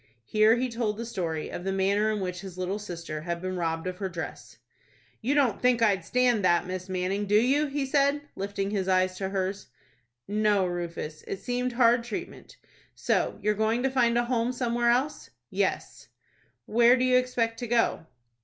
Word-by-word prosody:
Here 215 - +4
he 255 +1 0
told 230 -3 -2
the 230 - -4
story 170 -8 -3
of 175 - -6
the 195 - -1
manner 200 +3 +1
in 210 -2 -2
which 180 -1 -4
his 190 -2 -9
little 185 +3 -2
sister 170 -6 -6
had 170 +1 -3
been 185 +1 -4
robbed 165 -1 -2
of 185 0 -4
her 195 -2 -2
dress. 170 -1 -7 0.6
"You 265 +6 0
don't 265 -8 +2
think 250 -2 +3
I'd 195 -5 +3
stand 245 +1 +2
that, 175 -1 +3
Miss 185 0 -5
Manning, 190 +2 -1
do 210 +1 +5
you?" 280 +6 +2
he 280 0 -2
said, 280 +1 +2
lifting 195 0 -3
his 195 -3 -1
eyes 185 0 +2
to 190 0 -3
hers. 195 0 -3 0.6
"No, 210 -2 +2
Rufus; 170 -3 -5
it - - -3
seemed 250 0 -2
hard 235 0 +4
treatment. 235 -3 -7 0.4
So - - 0
you're 210 - +3
going 220 +3 0
to 265 - +1
find 240 -3 +2
a 240 - +2
home 240 0 0
somewhere 240 -1 0
else?" 260 +5 0 0.2
"Yes." - - -2 0.6
"Where 240 +3 +5
do 255 - +1
you 255 0 +4
expect 235 -3 0
to 240 - -4
go?" 230 -8 +1
210 Hz, 190 wpm, -27 LUFS, 185-240 Hz, 0.6 s, do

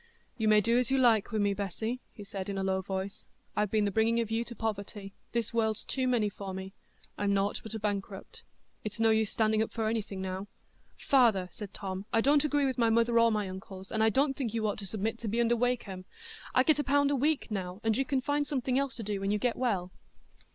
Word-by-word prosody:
"You 220 -2 0
may 215 0 +6
do 230 +4 +3
as 250 - 0
you 270 - +3
like 235 -4 +4
wi' 220 - -1
me, 205 -1 +2
Bessy," 215 +5 -3
he 205 - -10
said, 195 -1 -6
in 195 - -3
a 190 - -1
low 190 0 +1
voice; 190 +1 -5 0.3
"I've 210 -1 +1
been 215 0 +2
the 200 - 0
bringing 225 +3 +2
of 225 -2 -2
you 225 +1 +1
to 235 - -8
poverty—this 210 +1 -4
world's 220 -2 +1
too 260 -1 -1
many 240 -4 +2
for 195 -2 -6
me—I'm 195 +1 -5
nought 200 +1 0
but 220 0 -7
a - - -3
bankrupt; 200 -2 -4 0.4
it's 215 +1 -5
no 225 0 +4
use 220 -1 +2
standing 220 -1 +2
up 220 - -1
for 225 -2 -1
anything 215 -3 -2
now." 190 +1 -4 0.5
"Father," 225 -9 +3
said 205 -2 -8
Tom, 190 -1 -5
"I 225 - +3
don't 285 +5 +4
agree 290 -1 +2
with 260 -1 -1
my 230 -1 +4
mother 230 +1 +3
or 230 0 +5
my 210 -2 0
uncles, 190 +1 -9
and 220 - 0
I 220 - +5
don't 270 +4 +2
think 240 -5 -3
you 220 -1 0
ought 205 - -2
to 200 - -4
submit 220 +4 -2
to 230 - -5
be 225 +3 0
under 235 0 +3
Wakem. 225 -6 -1 0.5
I 255 - +6
get 300 +1 +3
a - - +2
pound 285 0 +3
a - - +2
week 285 -2 0
now, 185 -2 -3
and 225 -1 +2
you 270 - +2
can 270 -1 0
find 290 +2 0
something 260 -2 0
else 275 -1 -2
to 230 - -6
do 205 -1 -2
when 195 - -1
you 210 - +2
get 235 +3 0
well." 195 -8 -1
220 Hz, 240 wpm, -30 LUFS, 200-240 Hz, 0.5 s, may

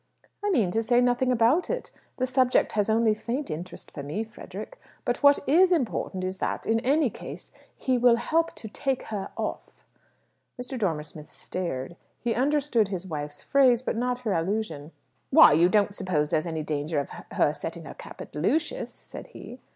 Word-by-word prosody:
"I 410 - +1
mean 230 - +2
to 225 - +1
say 240 +2 +3
nothing 245 +1 +2
about 250 +8 +3
it. - - -3 0.3
The 255 - +1
subject 255 -1 +2
has 210 0 0
only 225 0 +4
a - - +3
faint 245 +6 -4
interest 170 +4 -7
for 145 - -7
me, 150 +10 -3
Frederick. 365 - -9 0.3
But - - -1
what 285 -1 +7
is 355 +7 +5
important 235 - 0
is 185 +1 -3
that, - - -2
in 225 0 +2
any 270 +1 +2
case, - - -9 0.3
he 255 -2 +1
will 240 -1 +6
help 325 +8 0
to 220 - -7
take 265 +4 -2
her 200 -2 -3
off." - - -5 0.7
Mr. 250 +2 -5
Dormer 175 -10 -1
Smith 150 0 -11
stared; 170 -3 -4 0.2
he 235 -1 0
understood 270 -4 +2
his 190 -2 -4
wife's 150 -4 -6
phrase, 255 -3 +4
but - - -1
not 250 +1 -1
her 220 -5 -1
allusion. 165 -4 -2 0.4
"Why, 310 - +8
you 170 +4 +5
don't 205 0 +3
suppose 170 -7 0
there's 155 +2 +1
any 160 -2 -3
danger 150 0 -1
of 140 - -4 0.3
her - - +3
setting - - -6
her - - -8
cap - - -11
at - - -10
Lucius?" 300 - 0
said - - -10
he. - - -11
225 Hz, 190 wpm, -27 LUFS, 175-260 Hz, 0.7 s, Why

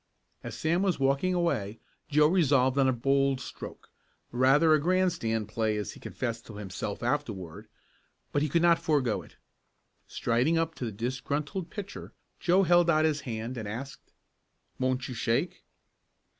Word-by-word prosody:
As - - -6
Sam 170 +3 +1
was 190 -6 +1
walking 140 +7 +2
away 115 - -1 0.3
Joe 150 0 +5
resolved 140 -7 +3
on 135 - +4
a - - +4
bold 135 +2 +1
stroke, - - -9 0.4
rather 135 +6 +4
a 155 - +4
grandstand 165 - +1
play 110 0 -1
as 105 -3 -3
he - - -13
confessed 115 -2 -4
to 110 - -10
himself 100 +1 -5
afterward, 105 - -3 0.6
but 145 - +1
he 150 - 0
could 170 +4 +2
not 170 -1 +5
forego 140 -9 +1
it. - - -17 0.7
Striding 125 +8 +1
up 165 0 0
to 130 - -5
the 115 - -3
disgruntled 140 - -3
pitcher 205 0 -8 0.3
Joe 185 +2 +3
held 175 -1 +4
out 155 -1 +4
his 150 -2 +1
hand 115 +3 -4
and 110 - -5
asked: 125 +7 -7 0.7
"Won't 130 0 0
you 125 - -5
shake?" 120 +8 -1
135 Hz, 155 wpm, -29 LUFS, 115-165 Hz, 0.7 s, Joe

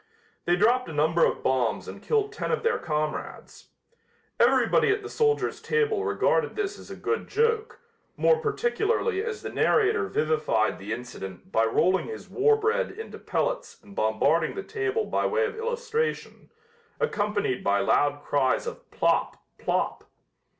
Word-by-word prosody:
They 175 - +3
dropped 230 +3 +2
a - - -6
number 160 +3 +2
of - - -2
bombs 130 -3 0
and - - -8
killed 430 -1 0
ten - - -3
of 470 - -1
their 465 0 +1
comrades. 155 -2 -4 0.7
Everybody - - +4
at 410 +1 +1
the 420 - -6
soldier's 440 -1 +1
table 440 -3 +1
regarded 455 +2 +1
this 405 -1 -3
as - - -13
a - - -7
good 455 - -2
joke, 450 0 0 0.4
more 480 - +4
particularly 455 -1 0
as 450 -2 -5
the - - -5
narrator 430 -1 +2
vivified 155 - 0
the 100 +3 -7
incident 95 -6 -7
by 110 0 +3
rolling 180 +11 +2
his 440 - -8
war 440 +2 +4
bread 450 +3 0
into 445 - -9
pellets - - -2
and 200 - -15
bombarding 110 +9 +1
the 395 - -4
table 425 +1 -1
by - - 0
way 460 0 +1
of 450 0 -4
illustration, 465 0 -3 0.5
accompanied 205 - -1
by 100 0 +2
loud 145 +7 +2
cries 135 -3 +1
of - - -8
"Plop! - - +1 0.2
Plop!" - - -1
410 Hz, 155 wpm, -26 LUFS, -, 0.7 s, Everybody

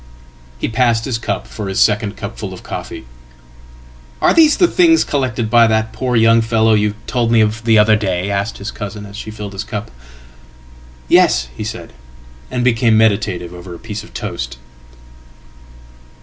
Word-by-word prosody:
"He - - -2
passed 115 0 +1
his 120 -4 -2
cup 100 -4 -3
for 105 -2 -7
his 95 - -2
second 105 -1 +2
cupful 100 -2 -6
of 90 - -11
coffee."Are 60 0 -6
these 315 -2 +5
the 355 - +5
things 335 -2 +4
collected 125 -5 -1
by 115 +1 +5
that 110 0 0
poor 125 -2 -2
young 115 0 +5
fellow 110 -1 +2
you 105 -1 +1
told 120 -2 0
me 115 - +4
ofthe 110 +1 +2
other 105 0 +5
day?" 95 -2 -2
asked 100 +2 -2
his 100 - -6
cousin, 105 0 -7
as 100 0 -11
she 110 - -7
filled 105 -2 -7
his 100 +3 -4
cup."Yes," - - -3
he - - -5
said, 105 -6 -7 0.6
and 125 -1 -2
became 115 -2 +3
meditative 100 -5 +1
over 90 0 -9
a - - -9
piece 105 -2 -7
of - - -15
toast." - - -5
105 Hz, 160 wpm, -17 LUFS, 85-115 Hz, 0.6 s, these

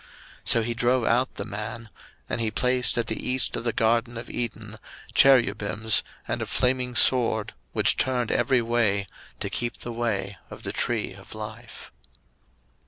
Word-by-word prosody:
01:003:024 - - -22 0.4
So 115 - +5
he 120 +1 -1
drove 125 0 +2
out 125 +3 +1
the 100 - -4
man; 110 +2 -6 0.4
and 120 - -2
he 110 - 0
placed 125 +3 +2
at 120 - +1
the 110 - -4
east 130 0 +1
of - - -4
the 120 - 0
garden 115 +1 +1
of 115 - -7
Eden 110 -2 -5 0.4
Cherubims, 110 -5 +4 0.3
and - - -2
a - - -3
flaming 125 -1 0
sword 115 -5 +3 0.2
which - - +2
turned 125 -3 0
every 130 -3 +2
way, 110 -4 +1 0.4
to - - -2
keep 120 -2 -2
the 120 - -6
way 105 -5 -2
of - - -11
the - - -3
tree 115 -5 -1
of 95 +2 -13
life. 110 +2 -9
115 Hz, 170 wpm, -26 LUFS, 110-125 Hz, 0.4 s, So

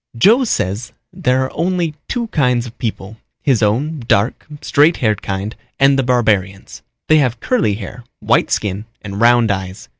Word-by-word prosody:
"Joe 230 - +5
says 105 - -2 0.2
there 130 +1 +1
are 130 - -6
only 170 -1 -1
two 240 -1 -2
kinds 125 - +1
of 120 - -10
people, 110 -2 -5 0.3
his 130 -6 +2
own 135 +9 0
dark, 100 +5 +1 0.2
straight 150 +3 +3
haired 110 -4 0
kind 100 +3 -4 0.2
and 135 0 +5
the 135 - +2
barbarians. 110 -7 0 0.3
They 155 0 +5
have 125 -4 0
curly 200 - 0
hair, 110 +4 -8 0.2
white - - +2
skin 105 0 -2 0.2
and 100 0 -6
round 120 -2 +4
eyes. 95 -7 -5
120 Hz, 160 wpm, -17 LUFS, 105-140 Hz, 0.3 s, Joe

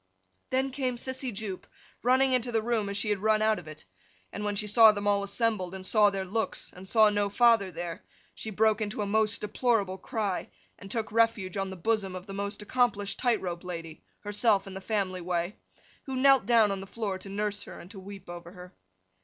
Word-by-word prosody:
Then 265 +1 0
came 255 -2 -1
Sissy 260 +1 -3
Jupe, 200 -3 -5 0.3
running 260 +2 +3
into 250 -1 +1
the 225 -2 +1
room 225 -3 0
as 200 - -3
she 210 - -1
had 205 - 0
run 215 +1 +2
out 220 -2 +3
of 170 - -13
it. 155 -6 -11 0.5
And 210 - -4
when 205 0 -1
she 210 - -1
saw 220 +1 +7
them 205 -1 -4
all 200 -1 +3
assembled, 200 -2 -1
and 190 0 -8
saw 210 0 +5
their 195 -1 -3
looks, 215 +2 -2
and 185 +1 -11
saw 215 -2 +6
no 205 -1 +1
father 225 -2 +4
there, 175 -2 -6 0.3
she 220 - -7
broke 220 +1 +2
into 210 0 -2
a - - -2
most 215 +1 +1
deplorable 210 -3 0
cry, 205 -2 -2 0.3
and 195 - -10
took 220 -1 -3
refuge 225 -5 +2
on 195 -1 -1
the 190 - -6
bosom 195 0 -1
of 185 0 -7
the 195 - -8
most 200 +1 -4
accomplished 215 -4 0
tight 240 -3 +2
rope 175 -1 -4
lady 165 -3 -7 0.2
(herself 205 -1 +2
in 195 - -9
the 190 - -7
family 190 -3 -1
way), 175 +2 -2 0.5
who 265 - -3
knelt 270 -4 +5
down 225 -4 +5
on 195 -1 -3
the 195 - -9
floor 200 -3 -3
to 195 - -9
nurse 205 +1 -2
her, - - -9
and 180 - -12
to 195 - -9
weep 195 0 -10
over 175 0 -9
her. 180 -1 -12
205 Hz, 220 wpm, -29 LUFS, 190-225 Hz, 0.5 s, saw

